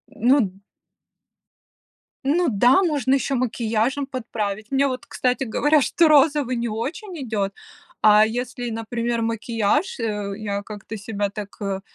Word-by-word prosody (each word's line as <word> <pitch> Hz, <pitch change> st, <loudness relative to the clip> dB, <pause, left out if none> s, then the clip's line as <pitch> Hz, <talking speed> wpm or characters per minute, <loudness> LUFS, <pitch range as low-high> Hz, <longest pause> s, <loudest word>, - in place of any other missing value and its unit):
Ну 225 Hz, -6 st, +2 dB, 1.6 s
Ну 325 Hz, +5 st, +2 dB
да, 245 Hz, -, +4 dB
можно 285 Hz, -6 st, +1 dB
еще 275 Hz, 0 st, +1 dB
макияжем 240 Hz, +2 st, 0 dB
подправить. 225 Hz, -4 st, -4 dB
Мне 275 Hz, +1 st, +3 dB
вот, 255 Hz, -2 st, -4 dB
кстати 255 Hz, +2 st, -1 dB
говоря, 295 Hz, +6 st, +3 dB
что 330 Hz, +4 st, +3 dB
розовый 285 Hz, -4 st, +4 dB
не 235 Hz, -, -1 dB
очень 305 Hz, -, -5 dB
идет, 205 Hz, -4 st, -2 dB, 0.5 s
а 215 Hz, 0 st, +7 dB
если, 245 Hz, +2 st, -4 dB
например, 230 Hz, +1 st, -2 dB
макияж, 230 Hz, -, 0 dB
а, 210 Hz, -3 st, -2 dB
я 200 Hz, -1 st, -3 dB
как-то 215 Hz, +1 st, -8 dB
себя 205 Hz, -1 st, -3 dB
так, 205 Hz, 0 st, -8 dB
э, 195 Hz, -1 st, -2 dB
235 Hz, 130 wpm, -23 LUFS, 215-270 Hz, 1.6 s, а